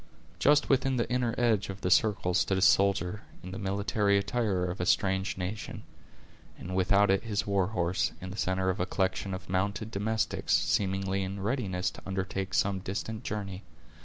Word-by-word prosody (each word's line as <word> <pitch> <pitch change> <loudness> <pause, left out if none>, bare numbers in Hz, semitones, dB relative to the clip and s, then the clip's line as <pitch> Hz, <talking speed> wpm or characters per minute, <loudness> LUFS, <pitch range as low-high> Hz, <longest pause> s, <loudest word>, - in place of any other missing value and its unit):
Just 145 +1 +4
within 135 -1 +2
the 120 - 0
inner 125 -2 0
edge 110 -5 +2
of 95 +1 -7
the 90 - -1
circle 95 -1 +3
stood 95 +1 +2
a - - 0
soldier, 100 0 +3 0.2
in 90 - -7
the 95 - -6
military 100 +1 +1
attire 100 -3 0
of 90 0 -4
a - - 0
strange 95 -1 +1
nation; 95 +4 -5 0.7
and 95 +1 -6
without 100 +2 +4
it 95 +1 +2
was 115 - -10
his 105 0 0
warhorse, 95 -3 0
in 95 0 -7
the - - -7
center 95 -1 0
of 95 - -6
a 90 - 0
collection 95 +1 -1
of 95 -2 -9
mounted 100 +4 -1
domestics, 110 +1 0
seemingly 95 0 0
in 95 +1 -4
readiness 100 -4 -1
to - - -12
undertake 95 0 -3
some 100 -1 +1
distant 105 +4 -4
journey. 100 -6 -4
95 Hz, 180 wpm, -29 LUFS, 95-105 Hz, 0.7 s, Just